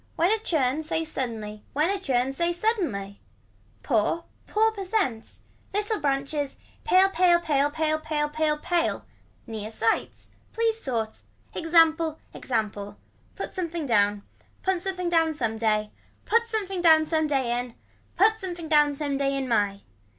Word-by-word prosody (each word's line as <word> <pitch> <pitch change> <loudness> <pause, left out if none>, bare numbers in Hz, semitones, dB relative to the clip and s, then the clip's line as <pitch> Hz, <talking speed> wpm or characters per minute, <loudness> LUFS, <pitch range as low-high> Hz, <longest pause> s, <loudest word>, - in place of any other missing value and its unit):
When 345 +4 +3
a 440 - +2
churn 300 - 0
say 325 +1 -2
suddenly 220 -8 -4
when 305 +6 +2
a 400 - -1
churn 265 -6 0
say 340 +5 0
suddenly. 335 - -2 0.6
Poor 265 +7 +1 0.2
pour 440 +1 +3
percent. 390 - -2 0.4
Little 420 +1 0
branches. 280 0 -1 0.3
Pale. 380 -2 +5
Pale. 350 -1 +4
Pale. 290 -3 +2
Pale. 310 +1 0
Pale. 305 -1 -1
Pale. 305 0 0
Pale. 340 +2 -1 0.4
Near 215 -2 -5
sights. 225 0 -1 0.2
Please 450 0 0
sorts. 225 -4 -3 0.3
Example. 325 -1 +3 0.2
Example. 210 -4 -3 0.4
Put - - -6
something 340 -4 -3
down. 205 -4 +2 0.4
Put 375 -2 +1
something 370 -1 -3
down 325 -2 +2
some 225 -5 -2
day. 215 -1 +1 0.3
Put 465 +1 +2
something 395 -5 -2
down 320 -2 +6
some 315 0 +1
day 265 -5 0
in. 245 -1 -6 0.4
Put 440 +4 +4
something 350 -3 -6
down 295 -2 +4
some 285 -1 -2
day 275 0 0
in 270 -1 -2
my. 205 -4 +1
310 Hz, 145 wpm, -26 LUFS, 245-350 Hz, 0.6 s, down